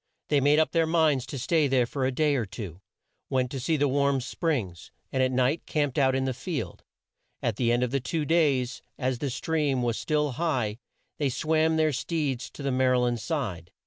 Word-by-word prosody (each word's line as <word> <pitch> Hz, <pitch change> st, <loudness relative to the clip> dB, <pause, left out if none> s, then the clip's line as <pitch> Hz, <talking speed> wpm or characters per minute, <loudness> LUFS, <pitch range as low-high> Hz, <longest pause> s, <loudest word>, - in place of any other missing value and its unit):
They 145 Hz, -2 st, +3 dB
made 145 Hz, +2 st, +4 dB
up 160 Hz, -, +3 dB
their 165 Hz, -1 st, +2 dB
minds 155 Hz, -6 st, +2 dB
to 135 Hz, -, -5 dB
stay 155 Hz, +4 st, +2 dB
there 130 Hz, -2 st, +3 dB
for 130 Hz, +2 st, -1 dB
a -, -, 0 dB
day 150 Hz, +3 st, +2 dB
or 120 Hz, -6 st, 0 dB
two; 95 Hz, -3 st, -8 dB, 0.5 s
went 130 Hz, -1 st, 0 dB
to 135 Hz, -, -4 dB
see 155 Hz, +5 st, 0 dB
the 145 Hz, 0 st, +2 dB
Warm 140 Hz, 0 st, +2 dB
Springs, 120 Hz, -, -3 dB, 0.2 s
and 130 Hz, -, 0 dB
at 130 Hz, 0 st, +2 dB
night 130 Hz, +5 st, +1 dB
camped 145 Hz, -2 st, 0 dB
out 130 Hz, -1 st, +3 dB
in 135 Hz, 0 st, 0 dB
the 130 Hz, -, -1 dB
field. 155 Hz, +3 st, -5 dB, 0.6 s
At 110 Hz, -3 st, 0 dB
the 120 Hz, -2 st, +2 dB
end 120 Hz, +1 st, +2 dB
of 125 Hz, +1 st, -2 dB
two 155 Hz, +4 st, -2 dB
days, 140 Hz, -6 st, +1 dB, 0.2 s
as 130 Hz, -2 st, -1 dB
the 140 Hz, -, -2 dB
stream 140 Hz, 0 st, 0 dB
was 120 Hz, -2 st, 0 dB
still 150 Hz, -2 st, 0 dB
high, 125 Hz, -7 st, -1 dB, 0.4 s
they 145 Hz, -2 st, +1 dB
swam 160 Hz, +4 st, +1 dB
their 155 Hz, -1 st, +2 dB
steeds 135 Hz, -2 st, -2 dB
to 145 Hz, -, -10 dB
the 140 Hz, -, 0 dB
Mar 130 Hz, 0 st, +3 dB
y -, -, +3 dB
land 120 Hz, -1 st, +1 dB
side. 105 Hz, -, -3 dB
135 Hz, 210 wpm, -27 LUFS, 125-150 Hz, 0.6 s, made